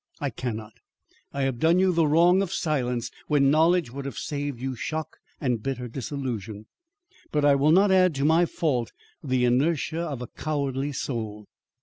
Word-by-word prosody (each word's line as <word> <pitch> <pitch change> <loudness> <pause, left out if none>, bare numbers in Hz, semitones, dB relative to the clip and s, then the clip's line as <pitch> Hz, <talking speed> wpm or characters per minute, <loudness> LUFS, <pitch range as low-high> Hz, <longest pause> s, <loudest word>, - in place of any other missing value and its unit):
I 140 -2 -2
cannot. 110 -2 -5 0.6
I 140 - -2
have 130 -3 -1
done 165 +4 +4
you 185 0 +3
the 165 -2 +3
wrong 175 +5 +5
of 195 - -2
silence 125 -7 -1 0.2
when 140 -2 +3
knowledge 160 -2 +3
would 140 +1 -6
have 135 -5 -6
saved 145 -3 -4
you 130 +1 -3
shock 155 +6 -4 0.2
and 125 -5 -1
bitter 125 0 -3
disillusion, 115 -5 -5 0.7
but 150 -1 +1
I 145 - +6
will 140 +2 +3
not 195 +4 +5
add 185 -4 +4
to 135 +1 0
my 165 +3 +4
fault 140 -11 -1 0.3
the 130 -3 +1
inertia 155 +6 +1
of 140 -7 -4
a - - -7
cowardly 140 -1 -2
soul. 110 -6 -4
140 Hz, 170 wpm, -26 LUFS, 125-160 Hz, 0.7 s, I